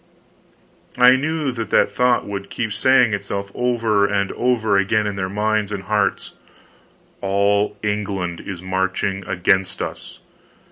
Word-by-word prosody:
I 125 +1 +7
knew 150 +1 -1
that 115 -2 -5
that - - +3
thought 125 -1 +2
would 100 -1 -6
keep 115 -3 -3
saying 125 0 +4
itself 100 0 -4
over 115 -4 +1
and 100 -1 -1
over 115 -4 +1
again 100 +2 +2
in 105 -1 -2
their 95 -1 -3
minds 105 +1 0
and 100 -2 -4
hearts, 105 +1 -1 0.9
_All 100 +1 +1
England 100 -4 -2
is 90 -3 -7
marching 95 +1 -1
against 95 +1 +1
us! - - -6
100 Hz, 135 wpm, -20 LUFS, 100-115 Hz, 0.9 s, I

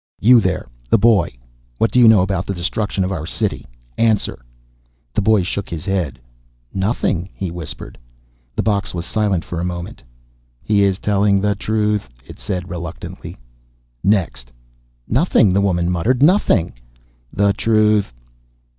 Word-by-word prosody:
You 120 +3 +6
there, 95 -7 -1 0.2
the - - +5
boy. 100 - +3 0.4
What 115 - +1
do 125 - +3
you 120 - +7
know 110 -4 +7
about 95 -1 -2
the 100 - -2
destruction 95 +3 -2
of 95 - -2
our 80 -4 -4
city? - - -3 0.3
Answer!" 110 - +1 0.7
The - - +1
boy 105 -1 +3
shook 100 +2 -4
his 85 -3 -6
head. 90 -10 -2 0.5
"Nothing," 95 -3 -1
he 95 -3 -4
whispered. 80 -8 -7 0.6
The - - 0
box 105 -3 -1
was 85 0 -4
silent 100 -3 0
for 85 - -5
a - - -2
moment. 90 -1 -5 0.6
"He 105 -1 +2
is 100 -2 +2
telling 100 -1 +2
the 105 +1 +1
truth," 105 - -1 0.2
it - - -12
said 90 -2 -4
reluctantly. 85 -1 -7 0.7
"Next!" 95 - 0 0.6
"Nothing," 115 - +3
the 100 - +3
woman 90 -3 +1
muttered. 120 +10 +1
"Nothing." 150 - +3 0.6
"The 100 0 +2
truth." 105 - +2
100 Hz, 145 wpm, -19 LUFS, 90-105 Hz, 0.7 s, you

